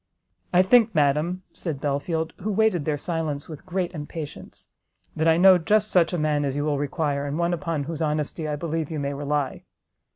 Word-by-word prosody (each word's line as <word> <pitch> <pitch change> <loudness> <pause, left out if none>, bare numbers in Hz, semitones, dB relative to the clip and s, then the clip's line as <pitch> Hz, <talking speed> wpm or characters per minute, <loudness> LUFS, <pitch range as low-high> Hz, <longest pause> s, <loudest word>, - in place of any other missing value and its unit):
"I 180 +1 +5
think, 225 +1 +4
madam," 155 +5 +1
said 160 -6 -4
Belfield, 160 +3 -2
who 215 +4 -3
waited 205 -7 +2
their 150 -2 0
silence 155 -3 -3
with 160 +4 -10
great 185 0 -2
impatience, 150 -1 -7 0.5
"that 160 +1 +1
I 160 0 +5
know 185 0 +7
just 215 +5 +2
such 175 -3 +4
a 175 - -1
man 150 -2 +1
as 140 0 -2
you 145 - -1
will 145 -2 0
require, 145 -1 -1
and 145 +2 -3
one 170 +1 +1
upon 160 -2 -2
whose 160 +2 -5
honesty 155 +1 -1
I 150 - -1
believe 160 0 -3
you 160 - -4
may 140 0 -2
rely." 145 -1 -2
160 Hz, 195 wpm, -25 LUFS, 145-175 Hz, 0.5 s, know